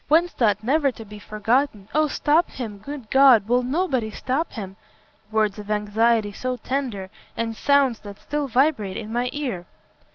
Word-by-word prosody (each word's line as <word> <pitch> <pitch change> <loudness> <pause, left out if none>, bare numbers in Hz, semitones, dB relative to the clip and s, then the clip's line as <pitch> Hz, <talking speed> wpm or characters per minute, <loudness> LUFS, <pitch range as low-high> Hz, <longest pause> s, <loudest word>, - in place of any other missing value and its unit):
whence 335 +3 +3
that 210 -3 +1
never 280 +3 +2
to 225 -2 -11
be 210 0 -11
forgotten 215 +1 -1
oh 310 +1 +3
stop 305 +4 +2
him! 220 -5 -7
good 275 +2 -8
God! 260 -6 +6
will 245 +2 +3
nobody 260 -3 -1
stop 265 +8 -2
him! 195 -5 -7 0.5
Words 215 -1 0
of 210 0 -9
anxiety 215 +1 +1
so 255 +5 -3
tender! 235 -7 -3 0.3
and 225 -1 -2
sounds 275 -2 +2
that 200 -1 -10
still 295 -1 -3
vibrate 250 -7 +1
in 220 0 -6
my 245 +1 0
ear!" 240 -12 -4
235 Hz, 165 wpm, -23 LUFS, 210-275 Hz, 0.5 s, God